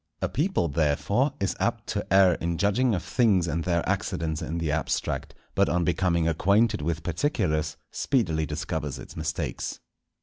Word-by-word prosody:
A - - 0
people 150 - +1
therefore 85 - +1
is 95 -2 0
apt - - -1
to - - -3
err 95 -2 +6
in 85 0 -2
judging 105 +6 +2
of 85 - -3
things 100 -8 +2
and 85 +1 -1
their 85 -1 0
accidents 80 -1 -1
in 80 +1 -3
the 80 -3 -1
abstract, 80 +1 -2 0.2
but - - +3
on 90 0 +1
becoming 85 -1 +1
acquainted 100 +6 +2
with 80 +2 -2
particulars, 80 - 0
speedily 80 - 0
discovers 75 -2 -3
its - - -10
mistakes. 80 0 -3
85 Hz, 160 wpm, -26 LUFS, 80-100 Hz, 0.2 s, err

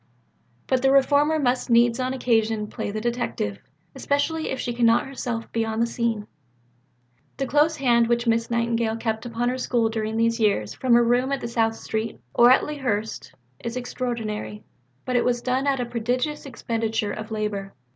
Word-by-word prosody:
But 260 -1 +1
the 270 0 +4
reformer 285 +3 +4
must 255 -4 0
needs 235 +1 +4
on 255 0 -1
occasion 225 -4 +1
play 210 - -5
the 215 +1 -3
detective 235 - -2 0.3
especially 315 +3 -1
if 265 - -3
she 240 - -2
cannot 235 -1 +3
herself 245 -4 -5
be 230 - 0
on 220 0 -3
the 230 - +3
scene. 230 -3 -2 1.1
The 270 - -1
close 300 +4 +3
hand 240 -5 +3
which 235 0 +1
Miss 230 0 +1
Nightingale 230 -1 0
kept 225 0 -3
upon 240 +1 -1
her 255 +1 -2
School 235 -3 +1
during 220 0 -2
these 230 +1 +1
years 200 - +1
from 250 -2 +2
her 240 - +5
room 245 +3 +2
in 275 -3 -2
South 225 -1 +1
Street 220 0 -4
or 240 0 +6
at 255 - +5
Lea 300 0 -5
Hurst 220 - -3 0.3
is 235 +1 -4
extraordinary, 230 -4 -4 0.4
but 255 - -2
it 245 - +3
was 245 -1 +1
done 260 +2 0
at 275 -2 +2
a 245 - -1
prodigious 250 +6 -2
expenditure 225 -4 -2
of 215 +2 -6
labour. 210 -3 -3
235 Hz, 180 wpm, -24 LUFS, 225-255 Hz, 1.1 s, or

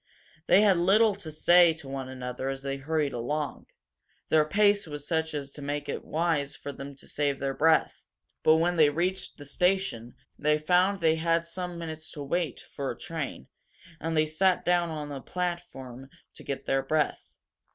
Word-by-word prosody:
They 195 - +6
had 195 -4 +5
little 205 +5 +4
to 165 -6 -7
say 175 +2 +5
to 160 -4 -11
one 135 -1 -5
another 130 0 -4
as 135 0 -5
they 135 0 -2
hurried 150 0 -1
along; 145 +5 -3 0.6
their 155 -1 +4
pace 205 +3 +3
was 145 -1 -7
such 160 -1 -1
as 140 -1 -4
to 145 - -10
make 145 +1 -3
it - - -4
wise 155 -3 -1
for 145 - -7
them 140 0 -9
to - - -14
save 145 -2 0
their 135 -1 -1
breath. 160 +3 +2 0.4
But 155 - +5
when 170 +2 +1
they 155 -2 +6
reached 180 +5 -2
the 145 - -11
station 160 -7 0 0.2
they 150 +1 +3
found 180 +5 +2
they 160 -1 +3
had 165 +1 +1
some 175 +1 -5
minutes 160 -2 -6
to 145 - -6
wait 160 0 -2
for 140 -1 -3
a - - -5
train, 160 - -5 0.5
and 165 0 -2
they 155 - +4
sat 180 +4 +1
down 175 -1 +2
on 150 -2 -5
the 140 -2 -6
platform 170 -9 -5 0.2
to - - -10
get 140 - -5
their 135 0 +1
breath. 150 +2 -1
155 Hz, 185 wpm, -28 LUFS, 140-175 Hz, 0.6 s, They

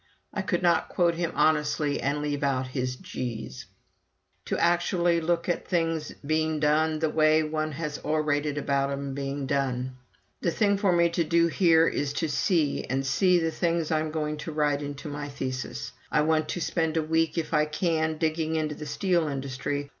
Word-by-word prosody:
[I 205 - -1
could 180 -1 -1
not 175 -1 +3
quote 170 -1 +2
him 170 0 -2
honestly 150 -2 +2
and 145 +2 -1
leave 145 -1 -2
out 135 -2 +1
his 130 -1 -2
"gees"] 120 - -6 0.8
to - - -1
actually 175 0 +2
look 170 +1 0
at 175 - -1
things 165 -3 0
being 155 +1 +1
done 155 +1 +2
the 160 0 0
way 155 0 +4
one 155 0 -2
has 150 0 -4
orated 150 -1 0
about 140 -1 0
'em 140 0 -3
being 140 0 -3
done. 130 -2 -1 0.5
The - - +1
thing 200 +3 +2
for 200 -2 +3
me 170 -1 +4
to 170 0 0
do 170 +1 +3
here 165 -2 +4
is 145 0 -1
to 165 - -1
see, 155 -1 +1
and 135 +2 -1
see 180 +7 +3
the 165 -1 0
things 165 -1 0
I'm 155 0 +1
going 150 -1 -2
to 155 +2 -6
write 150 -1 +1
into 145 0 -6
my 145 0 -5
thesis. 130 - -4 0.2
I 150 - +3
want 155 0 +1
to 175 - -3
spend 160 0 0
a 160 - +2
week, 160 +2 +1
if 165 0 -2
I 150 -1 +4
can, 160 0 0
digging 160 0 0
into 155 -1 -1
the 150 0 -8
steel 175 0 +1
industry. 140 +1 -3
155 Hz, 185 wpm, -27 LUFS, 145-165 Hz, 0.8 s, way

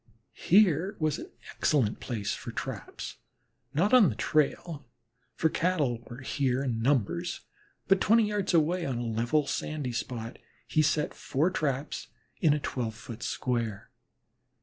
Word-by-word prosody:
Here 190 0 +3
was 155 -2 0
an - - -8 0.3
excellent 125 -8 +2
place 110 -6 -3
for - - -6
traps, - - -6 0.5
not 175 - +1
on 230 -9 +8
the 110 - -3
trail, 155 +3 0 0.5
for 160 - +2
Cattle 155 -8 +1
were 120 +1 -9
here 135 -1 0
in 120 -4 -1
numbers, 145 - 0 0.5
but 195 0 +4
twenty 225 +1 +5
yards 205 -2 0
away 170 +3 +3
on 135 -6 -2
a 120 - -3
level, 120 +6 +1
sandy 145 -3 -3
spot 115 -1 -4 0.3
he 155 - +3
set 150 0 +1
four 155 +7 0
traps 140 -3 -2 0.3
in 160 - +4
a 150 - +2
twelve 120 -5 -3
foot 115 +1 -9
square. 115 -5 -2
145 Hz, 145 wpm, -29 LUFS, 120-170 Hz, 0.5 s, on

